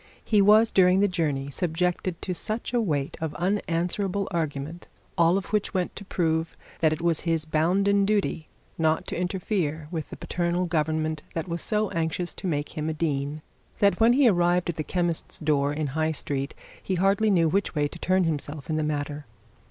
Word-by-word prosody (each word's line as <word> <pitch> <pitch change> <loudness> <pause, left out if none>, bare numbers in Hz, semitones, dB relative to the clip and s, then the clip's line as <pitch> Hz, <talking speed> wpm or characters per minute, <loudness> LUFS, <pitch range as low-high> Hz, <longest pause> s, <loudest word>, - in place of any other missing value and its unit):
He 210 -3 +4
was, 215 +3 +6
during 185 0 +5
the 205 - +4
journey, 150 -7 -1
subjected 180 +2 -1
to 185 - -2
such 215 +7 -4
a 240 - +3
weight 145 -9 -1
of 160 -2 -3
unanswerable 190 +1 -1
argument, 160 0 -3 0.3
all 170 +2 +4
of 195 +2 -6
which 210 -1 0
went 180 -1 -1
to 200 - -8
prove 165 -4 -1 0.2
that 160 -2 +3
it 155 +2 -3
was 170 -2 +2
his 165 -2 -1
bounden 190 +6 +2
duty 195 -6 0 0.3
not 160 0 +2
to - - -4
interfere 180 -4 -2
with 160 -3 -4
the - - -7
paternal 175 +1 -1
government 155 -1 -1
that 165 +2 -2
was 170 -1 -3
so 215 -1 0
anxious 165 +2 -1
to 190 - -5
make 145 -3 -2
him 155 0 -2
a - - -1
dean, 150 -1 -2 0.3
that 200 -1 +3
when 230 +2 +6
he 270 0 +5
arrived 175 -3 +3
at 160 - -15
the 155 - -1
chemist's 170 +1 -2
door 145 -2 +1
in 150 +1 -2
High 160 +1 +1
Street, 140 -1 -4 0.3
he 190 - -2
barely 195 +4 +3
knew 170 -5 +4
which 190 +2 0
way 145 -1 +2
to 170 - -11
turn 185 +2 +2
himself 150 -2 -3
in 155 - 0
the 155 - 0
matter. 145 -1 -3
170 Hz, 190 wpm, -26 LUFS, 155-190 Hz, 0.3 s, was